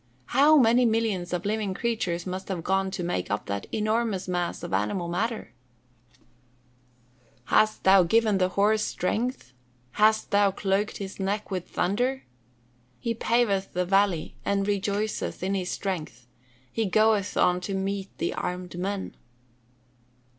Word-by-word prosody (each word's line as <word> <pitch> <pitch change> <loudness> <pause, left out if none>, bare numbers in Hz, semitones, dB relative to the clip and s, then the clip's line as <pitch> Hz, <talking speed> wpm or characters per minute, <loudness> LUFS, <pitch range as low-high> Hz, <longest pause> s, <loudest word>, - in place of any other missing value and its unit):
How 290 +4 +6
many 245 -1 +5
millions 220 -6 0
of 180 +1 -2
living 205 -2 -1
creatures 185 -7 -2
must 185 +1 -5
have 180 -4 -4
gone 195 +1 +1
to 190 -1 -4
make 90 - -2
up 105 +1 -2
that 100 0 -4
enormous 215 -3 0
mass 175 -1 -2
of - - -5
animal 105 - 0
matter! 215 +6 -3 0.6
[Verse: - - -33 1.2
"Hast 215 0 +2
thou 190 0 +7
given 210 +3 +3
the 185 0 +2
horse 210 +3 +2
strength? 215 - -2 0.4
hast 215 - +2
thou 200 0 +4
clothed 195 +1 -1
his 195 -1 -7
neck 200 +2 -2
with 185 -2 -4
thunder? 245 +8 0 0.8
He 230 - -1
paveth 225 -4 +1
the 180 0 0
valley, 195 -3 +1
and 200 0 0
rejoiceth 205 0 -2
in 190 +1 0
his 185 -2 -2
strength: 155 - -4 0.5
he 225 -2 -1
goeth 215 0 +2
on 180 0 +3
to 195 +2 -3
meet 195 0 -2
the - - -1
armed 180 -1 -4
men." 195 +1 -3
195 Hz, 145 wpm, -26 LUFS, 180-215 Hz, 1.2 s, thou